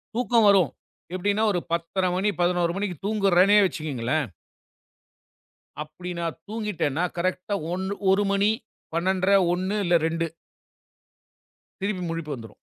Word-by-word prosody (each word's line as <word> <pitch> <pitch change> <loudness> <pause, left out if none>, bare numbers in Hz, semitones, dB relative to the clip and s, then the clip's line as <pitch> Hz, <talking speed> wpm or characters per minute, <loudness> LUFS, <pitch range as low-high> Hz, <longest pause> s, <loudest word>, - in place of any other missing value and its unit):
தூக்கம் 235 -2 +3
வரும். 190 -6 +4 0.4
எப்படின்னா 205 +3 +1
ஒரு 175 - +1
10:30 180 +3 0
,11 175 0 0
தூங்குறேனே 200 -1 +4
வச்சுக்கோங்களேன். 150 -5 -2 1.5
அப்படின்னா 170 +3 -6 0.2
தூங்கிட்டேன்னா 205 -8 -2
கரெக்ட்டா 185 +3 -1
ஆ - - -6
1 190 +2 -2 0.2
1 200 +2 +3
மணி, 200 +2 +3 0.4
12:30, 185 +3 +2 0.2
1 185 +3 -1
இல்ல 175 -2 +3
2 165 0 -1 1.6
திருப்பி 195 -1 -2
முழிப்பு 165 -2 -4
வந்துரும். 115 -3 -12
185 Hz, 105 wpm, -25 LUFS, 170-200 Hz, 1.6 s, வரும்